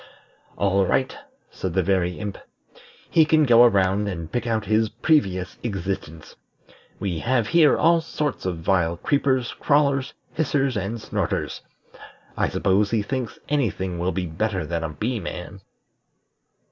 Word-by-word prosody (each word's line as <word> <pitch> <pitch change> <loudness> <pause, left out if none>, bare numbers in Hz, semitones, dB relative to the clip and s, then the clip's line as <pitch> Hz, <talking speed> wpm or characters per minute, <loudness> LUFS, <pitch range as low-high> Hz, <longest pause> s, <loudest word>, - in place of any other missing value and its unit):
"All 100 -1 +2
right," 130 +7 0 0.4
said 95 -3 -4
the 95 - +3
Very 90 -1 0
Imp; 105 -2 -5 0.7
"he 160 - +5
can 155 0 +3
go 120 -2 +7
around, 100 -2 +2
and 85 -5 -5
pick 120 - -2
out 110 -2 0
his 110 +1 +2
previous 100 - 0
existence. 95 -7 -5 0.6
We 90 -5 -2
have 120 0 0
here 165 -3 +5
all 165 +1 +4
sorts 150 -9 -3
of 90 -2 -2
vile 85 -3 +1
creepers, 130 +2 0
crawlers, 140 -2 +2 0.2
hissers, 140 -4 0
and 105 +3 -2
snorters. - - -3 0.7
I - - +1
suppose 100 +2 +1
he 110 -2 0
thinks 130 0 -4
any 140 -6 +1
thing 90 -2 -5
will 90 +2 0
be 95 -1 -2
better 95 +4 -2
than 85 -1 -3
a 80 - -2
Bee 110 +10 -3
man." 95 +1 -7
105 Hz, 145 wpm, -23 LUFS, 95-130 Hz, 0.7 s, go